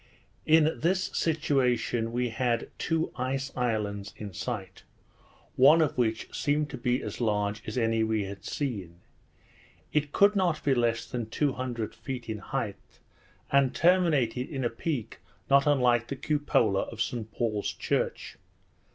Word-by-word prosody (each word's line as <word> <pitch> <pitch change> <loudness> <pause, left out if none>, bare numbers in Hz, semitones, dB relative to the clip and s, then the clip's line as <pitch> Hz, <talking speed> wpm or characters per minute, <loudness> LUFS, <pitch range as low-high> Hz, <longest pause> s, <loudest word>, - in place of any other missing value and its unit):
we 155 - +3
were - - +10
again 160 - +5
becalmed. 155 - +1
In 170 - +4
this 185 0 +1
situation 125 -7 +1
we 125 +1 0
had 115 0 -1
two 165 0 0
ice 135 +1 -2
islands 105 -5 -2
in 105 -3 -7
sight, 95 0 -5 0.7
one 140 +6 +7
of 155 -3 +2
which 115 -3 0
seemed 150 +1 0
to 135 - -5
be 125 +1 0
as - - -5
large 105 -2 0
as - - -4
any 115 -1 +2
we 110 -1 0
had 100 0 -8
seen. 95 - -4 0.9
It 150 -1 +1
could 200 +5 +5
not 175 -6 +1
be 140 - +3
less 120 -2 +1
than 120 -3 -4
two 140 +3 0
hundred 120 -4 -4
feet 130 -3 -6
in 110 -1 -3
height, 105 -2 -5 0.5
and 140 -2 +3
terminated 155 -9 +2
in 135 -5 -3
a 120 - 0
peak 125 -1 -4 0.3
not 140 +1 +5
unlike 125 -5 +3
the 140 - -4
cupola 130 -9 +1
of 115 - -10
St 110 -1 -2
Paul's 105 -2 -1
church. - - -2
125 Hz, 160 wpm, -28 LUFS, 110-145 Hz, 0.9 s, were